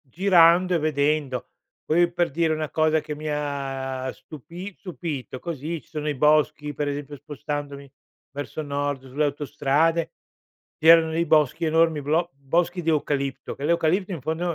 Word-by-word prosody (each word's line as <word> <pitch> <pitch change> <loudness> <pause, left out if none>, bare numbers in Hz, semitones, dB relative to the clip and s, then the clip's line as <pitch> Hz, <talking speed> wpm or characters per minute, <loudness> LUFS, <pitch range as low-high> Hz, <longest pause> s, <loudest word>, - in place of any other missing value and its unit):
girando 175 +3 +4
e - - +3
vedendo. 145 -3 0 0.4
Poi, 170 +2 +3
per 175 -2 0
dire, 160 +2 +1
una 155 -1 -3
cosa 155 0 +2
che 150 - -6
mi 155 +1 -8
ha 135 -3 -3
stupi 170 +6 -10
stupito, 160 -8 -6
così 165 +1 -5
ci - - -28
sono 150 -2 -4
i - - -2
boschi 150 +1 +2
per 145 +1 -2
esempio 145 0 -5
spostandomi 145 -1 -6 0.4
verso 145 +2 -5
nord 145 -2 -2
sulle 145 +4 0
autostrade, 145 +3 0 0.7
c'erano 160 0 +7
dei 165 +1 0
boschi, 155 0 +3
enormi 160 -1 +3
blo 165 +5 0
boschi 170 +6 0
di 165 - -4
eucalipto, 140 -3 -1
che 140 - -8
l'eucalipto 170 +4 +1
in 165 - -5
fondo 165 +4 -2
150 Hz, 155 wpm, -24 LUFS, 145-165 Hz, 0.7 s, c'erano